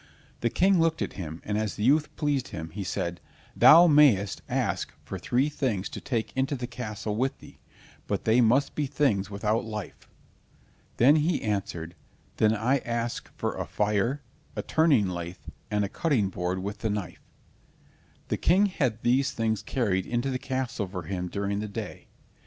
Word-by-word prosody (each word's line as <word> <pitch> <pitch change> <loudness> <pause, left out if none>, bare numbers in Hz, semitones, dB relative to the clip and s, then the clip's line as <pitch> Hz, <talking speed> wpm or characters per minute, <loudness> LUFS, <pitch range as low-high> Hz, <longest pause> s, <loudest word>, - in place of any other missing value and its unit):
The 120 - +1
King 190 - +3
looked 165 0 +2
at - - -5
him, 80 -3 -7
and 105 0 -1
as 110 -2 -2
the 105 - -4
youth 150 +5 +3
pleased 145 -4 0
him, 80 0 -7
he 100 +4 -5
said: 85 -2 -3 0.3
"Thou 170 +3 +9
mayst 145 - +4
ask - - -1
for - - -6
three 130 +4 +1
things 125 -10 -2
to - - -7
take 115 -4 -2
into 135 +2 0
the 125 -2 -4
castle 110 -4 -5
with 130 +4 0
thee, - - -15 0.5
but - - -2
they 115 +3 +4
must 125 +5 +3
be 150 -2 -1
things 125 -9 +1
without 105 +3 0
life." 105 -3 -7 0.9
Then 140 +6 +6
he 155 +2 +1
answered, 95 -5 -3 0.4
"Then 110 0 +3
I 125 +6 +1
ask 120 -1 -3
for - - -2
a - - -4
fire, 105 +7 0 0.3
a - - -3
turning 150 - +3
lathe, 85 0 -5 0.3
and 105 -1 +1
a - - -2
cutting 120 - 0
board 90 0 -2
with 100 +1 -5
the 110 - -1
knife." 105 -3 -4 1.1
The - - 0
King 190 +5 +4
had 130 - -1
these 130 +3 +2
things 110 -2 0
carried 100 -7 -1
into 120 +3 -1
the 130 - -2
castle 130 -6 -3
for 90 -1 -6
him 90 +2 -3
during 100 +1 -2
the 105 - -3
day. 100 - -7
115 Hz, 175 wpm, -27 LUFS, 100-135 Hz, 1.1 s, Thou